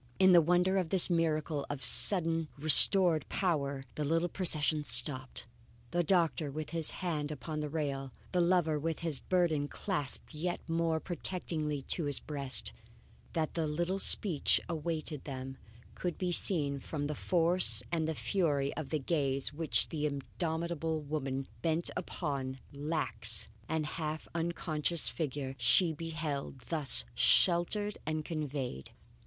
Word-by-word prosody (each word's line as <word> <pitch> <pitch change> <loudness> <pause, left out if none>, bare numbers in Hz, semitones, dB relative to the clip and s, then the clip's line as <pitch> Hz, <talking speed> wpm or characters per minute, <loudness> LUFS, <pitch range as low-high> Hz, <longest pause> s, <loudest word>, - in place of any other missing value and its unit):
In 190 -1 +5
the 175 -1 +7
wonder 180 +3 +1
of 175 -3 -3
this 185 0 +4
miracle 155 -3 -1
of 145 -2 -6
suddenly 165 -4 +5
restored 160 +2 +7
power, 140 -7 -2
the 150 - -4
little 165 +4 0
procession 155 -4 0
stopped, 130 -3 +3 0.5
the 175 0 0
doctor 165 -3 0
with 155 +2 -7
his 165 -2 0 0.2
hand 150 -4 -2
upon 155 +2 -6
the 150 -1 -4
rail, 140 -3 -4 0.2
the 180 - +1
lover 170 -3 +1
with 165 +2 -4
his 160 -5 -1
burden 170 -6 0
clasped 150 -4 -4
yet 175 +3 -3
more 165 -1 -1
protectingly 160 -5 -4
to 165 +4 0
his 145 -2 0
breast. 140 - -5 0.6
That 160 -2 -3
a 165 -2 -1
little 175 +5 -2
speech 180 -6 +6
awaited 155 -2 -4
them 135 -1 -7 0.4
could 180 -2 -5
be 180 -1 -2
seen 145 -6 0
from 145 +2 -5
the 150 - -3
force 175 +3 +3
and 160 -2 -1
fury 145 -8 -1
of 155 -4 -6
the 155 - -1
gaze 140 -2 -1
which 145 -7 +2
the 150 -1 -2
indomitable 160 +3 -3
woman 135 -3 -4
bent 165 0 +1
upon 135 -6 -4
the 140 - -14
lax 145 -9 +1 0.2
and 160 -1 -2
half 155 0 -5
unconscious 165 -1 -2
figure 145 -4 -5
she 125 +9 +3
beheld 155 -4 -5
thus 145 - +4
sheltered 175 - +2
and 155 -1 -3
conveyed. 140 - -5
155 Hz, 140 wpm, -31 LUFS, 145-170 Hz, 0.6 s, the